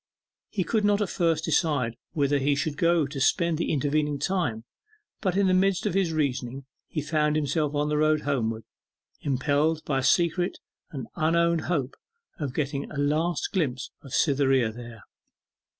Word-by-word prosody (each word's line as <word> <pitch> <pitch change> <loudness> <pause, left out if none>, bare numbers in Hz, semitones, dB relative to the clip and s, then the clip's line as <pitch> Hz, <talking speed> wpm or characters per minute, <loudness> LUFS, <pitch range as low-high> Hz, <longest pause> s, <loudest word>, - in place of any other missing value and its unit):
He 195 - -1
could 215 +3 0
not 205 0 +3
at 205 -3 -1
first 165 -2 +1
decide 150 -7 +1 0.2
whither 145 -1 +2
he 140 +1 +2
should 145 +1 -2
go 170 0 +3
to 140 -1 -5
spend 170 +2 +2
the - - 0
intervening 150 0 0
time; 140 - -1 0.6
but 185 -2 0
in 200 - +3
the 185 - +3
midst 190 0 +2
of - - 0
his 190 -3 +1
reasonings 135 -4 -2 0.2
he 155 - -3
found 150 0 +1
himself 150 0 0
on 145 0 +1
the 150 0 +1
road 155 0 +3
homeward, 115 -6 -1 0.6
impelled 145 +3 +1
by 135 -2 0
a - - -3
secret 175 +4 +2 0.3
and 135 -4 -6
unowned 170 0 +2
hope 145 -7 -1 0.5
of 140 -3 -4
getting 140 -2 -2
a 150 - -8
last 155 +4 0
glimpse 135 - -1
of 135 - -13
Cytherea 135 -5 +3
there. 115 -1 -10
150 Hz, 165 wpm, -26 LUFS, 140-170 Hz, 0.6 s, not